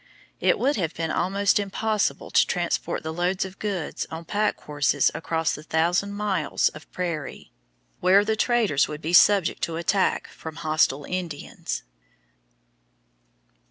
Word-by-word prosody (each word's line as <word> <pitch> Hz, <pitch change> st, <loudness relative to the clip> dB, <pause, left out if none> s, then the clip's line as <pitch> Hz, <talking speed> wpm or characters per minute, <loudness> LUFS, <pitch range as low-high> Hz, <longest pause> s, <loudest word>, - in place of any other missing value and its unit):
It -, -, +3 dB
would 275 Hz, 0 st, +1 dB
have 170 Hz, -5 st, -2 dB
been 165 Hz, -1 st, -2 dB
almost 200 Hz, +2 st, +2 dB
impossible 210 Hz, +1 st, -1 dB
to -, -, +4 dB
transport -, -, -1 dB
the 160 Hz, -, -4 dB
loads 180 Hz, +3 st, 0 dB
of 190 Hz, 0 st, -10 dB
goods 195 Hz, -7 st, -3 dB
on 160 Hz, +1 st, -7 dB
pack 210 Hz, +4 st, 0 dB
horses 145 Hz, -1 st, +1 dB
across 165 Hz, 0 st, -1 dB
the -, -, -6 dB
thousand 170 Hz, +6 st, 0 dB
miles 200 Hz, -7 st, 0 dB
of 150 Hz, -, -14 dB
prairie, 170 Hz, -6 st, -5 dB, 0.5 s
where 195 Hz, +3 st, +5 dB
the 220 Hz, +1 st, +1 dB
traders 220 Hz, -, +2 dB
would 150 Hz, +1 st, -7 dB
be 165 Hz, +3 st, -2 dB
subject 190 Hz, -2 st, +5 dB
to 165 Hz, -, -2 dB
attack 180 Hz, +4 st, +1 dB
from 160 Hz, -1 st, -9 dB
hostile 155 Hz, -3 st, +1 dB
Indians. 175 Hz, -5 st, -5 dB
175 Hz, 140 wpm, -25 LUFS, 160-200 Hz, 0.5 s, where